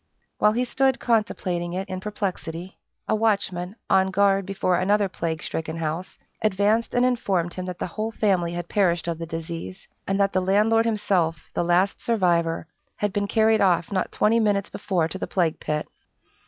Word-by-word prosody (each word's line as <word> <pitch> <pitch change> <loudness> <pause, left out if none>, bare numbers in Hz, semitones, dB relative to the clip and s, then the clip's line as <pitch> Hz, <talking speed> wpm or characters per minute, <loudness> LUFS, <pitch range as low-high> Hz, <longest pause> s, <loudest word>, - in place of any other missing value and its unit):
While 210 0 +4
he 245 +2 0
stood 265 +1 +1
contemplating 185 -6 0
it 190 +1 -3
in 185 -1 -4
perplexity, 185 -3 -5 0.3
a - - +1
watchman, 200 -4 0
on 190 0 +3
guard 195 0 +2
before 185 -2 +1
another 200 +3 +2
plague 165 -3 -3
stricken 160 0 -4
house, 165 +3 -4 0.2
advanced 215 +3 +1
and 245 +1 +4
informed 195 -9 0
him 185 - -5
that 180 -1 -5
the - - -3
whole 215 +5 -3
family 185 -6 +1
had 175 0 -4
perished 175 -4 +1
of 165 -1 -2
the 165 - -5
disease, 165 +3 -6 0.2
and 195 +1 0
that 195 0 +2
the 185 - +2
landlord 215 +4 +3
himself, 185 -7 0
the - - 0
last 175 +3 +2
survivor, 170 -8 +1 0.3
had 205 -2 -2
been 205 0 0
carried 220 +1 +3
off 175 -2 +2
not 185 -2 -1
twenty 225 +2 +3
minutes 205 -3 +1
before 190 -5 0
to 190 - -5
the - - -3
plague 170 -4 0
pit. 150 0 -2
190 Hz, 180 wpm, -24 LUFS, 175-210 Hz, 0.3 s, While